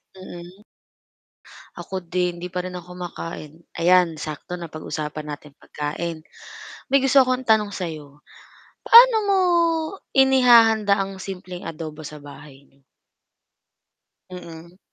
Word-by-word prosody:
Mm. 185 Hz, +1 st, -12 dB, 1.1 s
Ako 185 Hz, +1 st, -7 dB
din, 180 Hz, 0 st, -2 dB
hindi 180 Hz, +1 st, -8 dB
pa 180 Hz, -, -1 dB
rin 180 Hz, 0 st, -7 dB
ako 180 Hz, 0 st, -11 dB
kumakain. 170 Hz, -4 st, -8 dB, 0.3 s
Ayan, 180 Hz, -1 st, +4 dB
sakto 155 Hz, +3 st, -7 dB
napag-usapan 155 Hz, -3 st, -6 dB
natin 150 Hz, -1 st, -9 dB
pagkain 155 Hz, +2 st, -5 dB, 0.7 s
may 275 Hz, +1 st, +3 dB
gusto 270 Hz, +1 st, +5 dB
akong 255 Hz, 0 st, +1 dB
tanong 215 Hz, -3 st, +2 dB
sa 180 Hz, -3 st, -4 dB
'yo, 150 Hz, -2 st, -13 dB, 0.6 s
paano 475 Hz, 0 st, +8 dB
mo 400 Hz, -1 st, +2 dB, 0.7 s
inihahanda 235 Hz, -6 st, +5 dB
ang 195 Hz, 0 st, -4 dB
simpleng 185 Hz, -2 st, -8 dB
adobo 155 Hz, -1 st, -8 dB
sa 150 Hz, 0 st, -9 dB
bahay 140 Hz, -1 st, -14 dB
n'yo? 135 Hz, 0 st, -32 dB, 1.5 s
Mm. 170 Hz, -1 st, -11 dB
180 Hz, 115 wpm, -22 LUFS, 155-200 Hz, 1.5 s, paano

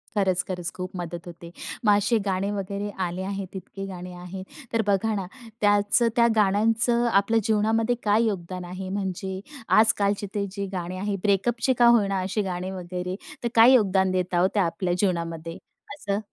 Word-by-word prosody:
खरंच, 190 Hz, -3 st, +2 dB
खरंच. 180 Hz, -2 st, -3 dB
खूप 185 Hz, 0 st, -5 dB
मदत 175 Hz, -1 st, -6 dB
होते. 170 Hz, 0 st, -10 dB, 0.3 s
मग 205 Hz, -1 st, +6 dB
असे 210 Hz, +3 st, +2 dB
गाणे 195 Hz, +1 st, 0 dB
वगैरे 200 Hz, 0 st, -3 dB, 0.2 s
आले 175 Hz, +1 st, -4 dB
आहेत 195 Hz, -1 st, -5 dB
इतके 195 Hz, +1 st, -7 dB
गाणे 180 Hz, -1 st, -7 dB
आहेत, 180 Hz, +1 st, -8 dB, 0.3 s
तर 230 Hz, -, +3 dB
बघा 205 Hz, +2 st, +2 dB
ना 195 Hz, -2 st, -2 dB, 0.4 s
त्याचं, 205 Hz, +3 st, +3 dB
त्या 235 Hz, -1 st, +5 dB
गाण्यांचं 225 Hz, +4 st, +2 dB
आपल्या 200 Hz, +4 st, +3 dB
जीवनामध्ये 220 Hz, +3 st, +2 dB
काय 215 Hz, +2 st, +3 dB
योगदान 185 Hz, -3 st, -3 dB
आहे? 185 Hz, +1 st, -6 dB
म्हणजे 190 Hz, -1 st, -3 dB, 0.4 s
आजकालचे 205 Hz, -2 st, +2 dB
ते 200 Hz, -1 st, 0 dB
जे 200 Hz, 0 st, -4 dB
गाणे 180 Hz, 0 st, -4 dB
आहे, 200 Hz, +2 st, -2 dB
ब्रेकअपचे 230 Hz, +5 st, +2 dB
का 240 Hz, -, +7 dB
होई 230 Hz, -4 st, +5 dB
ना, 195 Hz, -1 st, -1 dB
असे 195 Hz, +3 st, -1 dB
गाणे 185 Hz, -1 st, -3 dB
वगैरे, 180 Hz, 0 st, -4 dB, 0.3 s
तर -, -, +1 dB
काय 235 Hz, +3 st, +8 dB
योगदान 190 Hz, -5 st, +3 dB
देता 180 Hz, -1 st, 0 dB
ओ -, -, +5 dB
त्या 200 Hz, -3 st, +2 dB
आपल्या 175 Hz, +2 st, -1 dB
जीवनामध्ये 165 Hz, -3 st, -2 dB, 0.4 s
असं? 205 Hz, -8 st, -2 dB
195 Hz, 175 wpm, -25 LUFS, 180-210 Hz, 0.4 s, काय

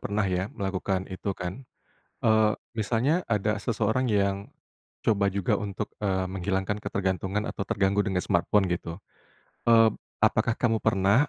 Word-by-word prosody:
pernah 105 Hz, +1 st, -1 dB
ya, 90 Hz, +1 st, 0 dB
melakukan 95 Hz, -1 st, -2 dB
itu 95 Hz, +1 st, -3 dB
kan? 95 Hz, +9 st, -6 dB, 0.6 s
Eee, 110 Hz, -1 st, +5 dB, 0.2 s
misalnya 120 Hz, -, +1 dB
ada 105 Hz, -1 st, 0 dB
seseorang 115 Hz, +3 st, 0 dB
yang 100 Hz, -2 st, +1 dB, 0.5 s
coba 100 Hz, -3 st, +2 dB
juga 100 Hz, -2 st, +1 dB
untuk, 105 Hz, 0 st, -4 dB
eee, 95 Hz, -2 st, +1 dB
menghilangkan 95 Hz, +2 st, -1 dB
ketergantungan 95 Hz, +2 st, -2 dB
atau 100 Hz, -, -4 dB
terganggu 100 Hz, 0 st, +1 dB
dengan 95 Hz, -3 st, 0 dB
smartphone 95 Hz, +3 st, +2 dB
gitu. 85 Hz, 0 st, -3 dB, 0.7 s
Eee, 115 Hz, -1 st, +7 dB, 0.3 s
apakah 110 Hz, +1 st, +2 dB
kamu 115 Hz, -2 st, +1 dB
pernah 100 Hz, +9 st, +3 dB
100 Hz, 135 wpm, -27 LUFS, 95-110 Hz, 0.7 s, Eee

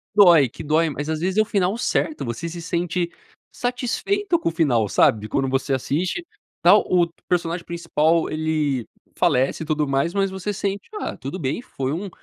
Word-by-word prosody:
Dói, 170 Hz, -, +7 dB
que -, -, -10 dB
dói, 155 Hz, +2 st, +2 dB
mas 145 Hz, +2 st, -4 dB
às 155 Hz, -1 st, -1 dB
vezes 185 Hz, +4 st, -1 dB
é -, -, +7 dB
o -, -, +1 dB
final 200 Hz, 0 st, 0 dB
certo. 305 Hz, +5 st, -1 dB
Você 120 Hz, +7 st, -4 dB
se 170 Hz, +1 st, -6 dB
sente 170 Hz, 0 st, -1 dB, 0.4 s
satisfeito 335 Hz, -, -1 dB
com -, -, -3 dB
o -, -, +2 dB
final, 125 Hz, -10 st, +2 dB
sabe, 110 Hz, -, +3 dB
de 105 Hz, -, -6 dB
quando 135 Hz, -1 st, 0 dB
você 135 Hz, +1 st, 0 dB
assiste, 175 Hz, -, -1 dB, 0.4 s
tal -, -, +7 dB
o 175 Hz, -2 st, +3 dB, 0.2 s
personagem 170 Hz, -1 st, -1 dB
principal 165 Hz, -1 st, +1 dB
ele 155 Hz, -5 st, -1 dB, 0.3 s
falece 130 Hz, +5 st, +2 dB
e -, -, -7 dB
tudo 150 Hz, -1 st, 0 dB
mais, 135 Hz, +5 st, 0 dB
mas 195 Hz, -1 st, +1 dB
você 190 Hz, +2 st, -3 dB
sente, 200 Hz, +1 st, -3 dB
"Ah, -, -, -4 dB
tudo 135 Hz, +7 st, -6 dB
bem, 140 Hz, -, -2 dB
foi 135 Hz, -, -4 dB
um 190 Hz, +5 st, -4 dB
165 Hz, 190 wpm, -22 LUFS, 145-190 Hz, 0.4 s, Dói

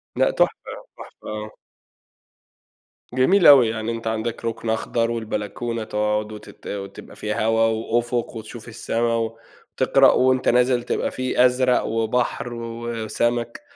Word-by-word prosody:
لأ -, -, +3 dB
تحفة، -, -, +2 dB, 0.4 s
تحفة -, -, -13 dB
آه. 105 Hz, 0 st, -5 dB, 1.6 s
جميل 170 Hz, +9 st, +4 dB
أوي، 135 Hz, -6 st, +8 dB
يعني 110 Hz, 0 st, -3 dB
أنتَ 115 Hz, -1 st, -5 dB
عندك 110 Hz, +1 st, -3 dB
رُكن 115 Hz, 0 st, -3 dB
أخضر، 115 Hz, +1 st, 0 dB
والبلكونة 115 Hz, +1 st, -3 dB
تقعد 105 Hz, 0 st, -1 dB
وتت 105 Hz, -, -12 dB
وتبقى 100 Hz, -1 st, -7 dB
فيها 105 Hz, 0 st, -2 dB
هوا 115 Hz, 0 st, +2 dB
وأفق 115 Hz, +2 st, -1 dB
وتشوف 110 Hz, +1 st, -9 dB
السَّما 115 Hz, 0 st, -1 dB, 0.6 s
وتقرأ، -, -, +5 dB
وأنتَ 130 Hz, 0 st, +2 dB
نازل 125 Hz, 0 st, +3 dB
تبقى -, -, -2 dB
في 130 Hz, -1 st, +2 dB
أزرق 125 Hz, 0 st, +2 dB
وبحر 120 Hz, +2 st, -1 dB
وسَمَك، 115 Hz, -, -3 dB
115 Hz, 120 wpm, -22 LUFS, 110-120 Hz, 1.6 s, أوي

